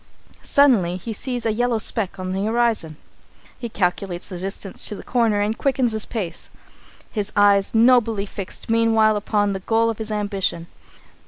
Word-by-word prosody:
Suddenly 220 -12 +3
he 225 +5 -6
sees 245 +1 -3
a 220 - +1
yellow 245 +1 +1
speck 200 -2 -2
on 185 0 -4
the 190 +1 -2
horizon. 225 -9 0 0.6
He 235 - -5
calculates 180 -2 -2
the 180 -3 -6
distance 195 +1 -5
to 210 - -2
the - - -10
corner 225 -4 +1
and 210 +2 0
quickens 260 -2 +1
his 220 -1 -3
pace, 185 -8 -5 0.6
his 210 -1 -2
eyes 200 0 +4
nobly 225 -3 +4
fixed 195 -1 -7
meanwhile 225 -1 +3
upon 205 -1 0
the 190 - -4
goal 225 +3 +1
of 225 - -9
his 220 0 -5
ambition. 200 -5 -1
215 Hz, 165 wpm, -22 LUFS, 195-230 Hz, 0.6 s, eyes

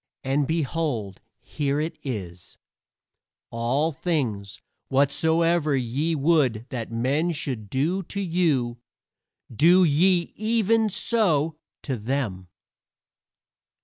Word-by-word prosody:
And 135 +1 0
behold, 145 - -2 0.2
here 145 -1 -2
is 160 +2 -2
it: 95 -9 -7 0.9
"All 130 +8 0
things 120 - -2 0.3
whatsoever 160 +3 +2
ye 135 +6 -1
would 135 -7 +2
that 115 -4 -5
men 135 +9 0
should 125 -9 -4
do 160 - 0
to 200 - -4
you, 160 -10 0 0.8
do 175 - +6
ye 175 +3 +3
even 220 0 +2
so 165 -8 +1 0.2
to 130 -4 -3
them." 110 -6 -3
145 Hz, 95 wpm, -25 LUFS, 120-170 Hz, 0.9 s, do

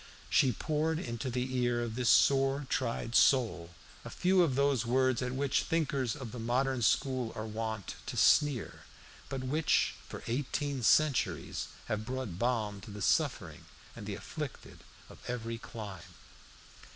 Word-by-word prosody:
She 130 - +4
poured 155 +5 -1
into 120 -5 -4
the 125 +1 -2
ear 120 -1 +1
of 115 -2 -4
this 125 0 0
sore 135 +1 +4
tried 115 0 -1
soul 115 -12 +3 0.3
a - - -7
few 185 +1 +3
of 155 -7 +2
those 140 -3 +2
words 130 +1 +2
at 125 0 -2
which 140 +1 +1
thinkers 140 -7 -1
of 130 -6 -7
the 125 - -7
modern 125 +2 0
school 125 +2 +1
are 110 - -4
wont 110 -3 -4
to - - -5
sneer, 145 -7 +3 0.4
but 135 -1 -4
which 150 +5 +2 0.2
for - - -8
eighteen 140 +2 -2
centuries 145 +3 +2 0.2
have 110 0 -2
brought 125 -7 -5
balm 110 -4 -1
to 105 - -11
the 105 -1 -6
suffering - - 0 0.3
and - - -8
the - - -3
afflicted - - -7 0.3
of - - -14
every 115 -2 -4
clime. 95 -7 -9
125 Hz, 150 wpm, -31 LUFS, 115-135 Hz, 0.4 s, She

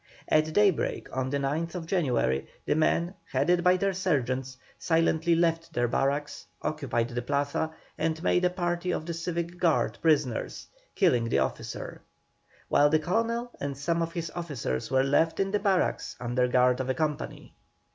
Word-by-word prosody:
At 155 0 +3
daybreak 200 -10 +1
on 130 0 -1
the 140 - 0
9th 165 +5 -2
January 125 - 0 0.2
the - - +2
men, 170 +3 +1 0.2
headed 175 +7 +2
by 180 0 +5
their 195 +1 0
sergeants, 130 -8 -1 0.2
silently 165 0 +2
left 165 -1 0
their 120 0 +1
barracks, 140 +4 -1 0.2
occupied 130 -6 -1
the 120 0 -3
Plaza, 145 +5 -1 0.3
and 160 +1 -1
made 180 - +2
a 180 - +4
party 175 0 -2
of 160 - -1
the 170 - -3
civic 170 +1 -4
guard 170 -3 +1
prisoners, 145 -7 +1 0.3
killing 125 - +3
the - - +2
officer; 65 -1 -3 0.7
while 145 +1 +4
the 155 - +4
Colonel 230 +8 -1
and 140 -1 -4
some 170 +4 0
of 165 0 -2
his 165 -2 -4
officers 145 - -3
were 130 0 +3
left 160 +4 +2
in 195 0 +1
the 210 - +1
barracks 195 -3 0
under 125 +1 +1
guard 125 0 +3
of 130 0 -2
a 130 - +1
company. 155 -2 -3
160 Hz, 165 wpm, -28 LUFS, 130-175 Hz, 0.7 s, by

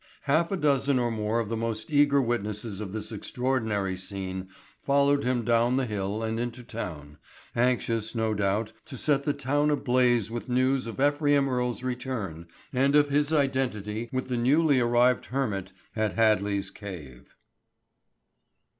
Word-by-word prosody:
Half 155 +5 +2
a 195 - 0
dozen 140 -3 +2
or 120 -1 +1
more 110 +1 -1
of 115 - -2
the 115 - -1
most 115 +4 -3
eager 145 -1 +5
witnesses 105 -4 -2
of 100 -3 -5
this 110 +1 -5
extraordinary 110 -4 -1
scene 95 0 -5 0.3
followed 140 0 +3
him 125 -2 0
down 120 +2 +3
the 135 - +1
hill 105 0 -3
and 110 0 -2
into 120 +1 -4
town, 80 -11 -7 0.4
anxious 115 -2 0
no 110 -1 0
doubt 105 +2 0
to 140 -5 -8
set 140 +1 +1
the 145 - +1
town 145 +2 +1
ablaze 125 -5 +2
with 120 +2 -5
news 130 0 +1
of 115 - -7
Ephraim 145 0 +3
Earle's 125 -1 -1
return 120 -10 -4 0.3
and 135 +3 +3
of 145 -1 +5
his 145 +1 +2
identity 120 -7 -1
with 130 0 -2
the 125 -1 -1
newly 140 +3 +3
arrived 120 +1 +3
hermit 105 -8 -2 0.2
at 110 -1 0
Hadley's 105 -3 +2
cave. 80 - -10
120 Hz, 155 wpm, -27 LUFS, 105-135 Hz, 0.4 s, eager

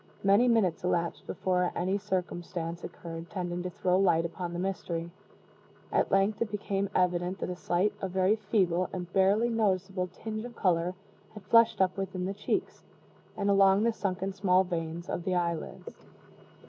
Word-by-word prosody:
Many 200 +5 +5
minutes 215 -9 +2
elapsed 170 -1 -1
before 180 -1 0
any 190 +3 0
circumstance 175 -3 -3
occurred 165 0 -8
tending 180 -2 -3
to 180 - -3
throw 180 +1 +1
light 170 -4 +3
upon 170 +1 -4
the 175 - -4
mystery. 175 -2 -3 0.8
At - - +2
length 195 +2 +2
it 230 - 0
became 200 -1 -2
evident 180 0 +1
that - - -3
a - - -4
slight, 180 +3 0
a 195 - -1
very 190 +3 +2
feeble, 190 -4 +1
and 180 -1 -6
barely 200 +5 +3
noticeable 190 -4 0
tinge 215 +3 -5
of 240 -1 -8
color 180 -1 +1 0.4
had 210 - -9
flushed 230 +1 +4
up 185 0 +2
within 190 -1 -3
the 195 - -2
cheeks, 205 +1 -2 0.5
and 200 - -1
along 195 0 +5
the 230 0 +2
sunken 195 -2 -2
small 190 -1 +3
veins 170 -1 -4
of 175 - -3
the 185 0 0
eyelids. 170 -2 -4
185 Hz, 165 wpm, -29 LUFS, 175-200 Hz, 0.8 s, Many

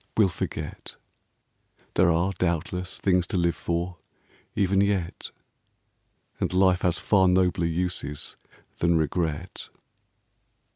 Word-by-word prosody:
We 110 - +6
'11 95 - 0
forget. - - -5 1.0
There 90 0 +4
are, 85 +4 +2
doubtless, 90 +1 -1
things 90 -3 +2
to 95 - -2
live 85 -1 +2
for 85 +1 -3 0.6
Even 100 -1 +2
yet. 100 -4 -1 1.1
And - - 0
life 90 -1 +3
has 90 -1 +1
far 95 -3 +3
nobler 90 -2 +2
uses 80 -4 -3 0.4
Than 85 -1 +3
regret. 80 -1 -2
90 Hz, 110 wpm, -26 LUFS, 85-95 Hz, 1.1 s, We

